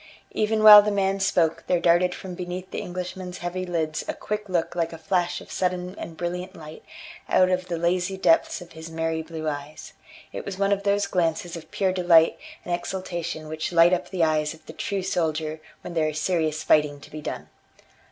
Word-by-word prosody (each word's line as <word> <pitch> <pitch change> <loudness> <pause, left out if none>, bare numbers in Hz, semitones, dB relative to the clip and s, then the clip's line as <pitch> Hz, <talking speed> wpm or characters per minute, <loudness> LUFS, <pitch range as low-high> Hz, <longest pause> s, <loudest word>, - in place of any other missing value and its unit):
Even 215 0 0
while 210 -1 +12
the 210 - -1
man 195 -1 0
spoke 170 -4 +1
there 180 - +2
darted 175 +1 +3
from 185 -1 -8
beneath 180 +1 -6
the - - -3
Englishman's 180 0 -6
heavy 180 +1 -4
lids 160 -3 -2
a - - -3
quick 210 -1 -4
look 175 -2 -1
like 170 -1 -1
a 165 - -8
flash 175 +2 0
of - - -13
sudden 180 0 -2
and 165 - -8
brilliant 180 +2 -4
light 155 -1 -11 0.5
out 185 0 +4
of 185 0 -1
the 170 - -2
lazy 180 +3 0
depths 325 - +2
of 175 - -12
his 160 +1 -9
merry 165 0 -2
blue 160 -1 -6
eyes; 145 0 -6 0.4
it - - -5
was 195 -2 -6
one 200 0 +1
of 200 0 +1
those 200 0 +1
glances 175 -2 -1
of 165 -1 -10
pure 190 -2 0
delight 175 -3 +4 0.3
and 175 - -2
exultation 175 -3 -4
which 155 +2 -4
light 170 +1 +6
up 180 0 -1
the 180 -3 0
eyes 155 -1 +1
of 160 - -22
the - - -10
true 200 -2 -3
soldier 160 -3 -1 0.2
when 175 - -8
there 155 -2 +1
is 155 0 -4
serious 160 -3 0
fighting 150 -1 +3
to - - -15
be 155 - -7
done. - - -6
175 Hz, 205 wpm, -25 LUFS, 160-185 Hz, 0.5 s, while